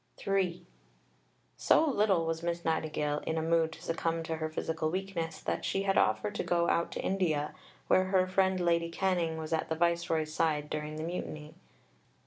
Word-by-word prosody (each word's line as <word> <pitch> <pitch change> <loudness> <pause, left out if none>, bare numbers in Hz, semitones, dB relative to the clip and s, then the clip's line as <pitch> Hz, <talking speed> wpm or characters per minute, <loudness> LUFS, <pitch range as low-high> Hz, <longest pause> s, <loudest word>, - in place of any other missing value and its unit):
III 190 -3 0 0.9
So 320 - +4
little 205 - +2
was 165 0 -2
Miss 170 0 -3
Nightingale 150 -2 0
in 160 - 0
a - - +1
mood 165 0 +2
to 165 - -12
succumb 165 -1 -1
to 160 0 -3
her 155 0 -2
physical 160 0 -2
weakness, 180 -2 -3
that - - -2
she 195 - 0
had 195 0 +1
offered 210 -1 +2
to - - -2
go 170 -1 +1
out 170 - +1
to - - -4
India, 160 -6 0 0.3
where 185 - +4
her 185 -1 +3
friend 190 0 +2
Lady 170 -1 +2
Canning 170 -2 0
was 160 0 -4
at 160 - -1
the 160 - 0
Viceroy's 170 -2 0
side 150 -2 0
during 150 0 -3
the 155 - -4
Mutiny. 155 -3 -5
165 Hz, 180 wpm, -31 LUFS, 160-185 Hz, 0.9 s, So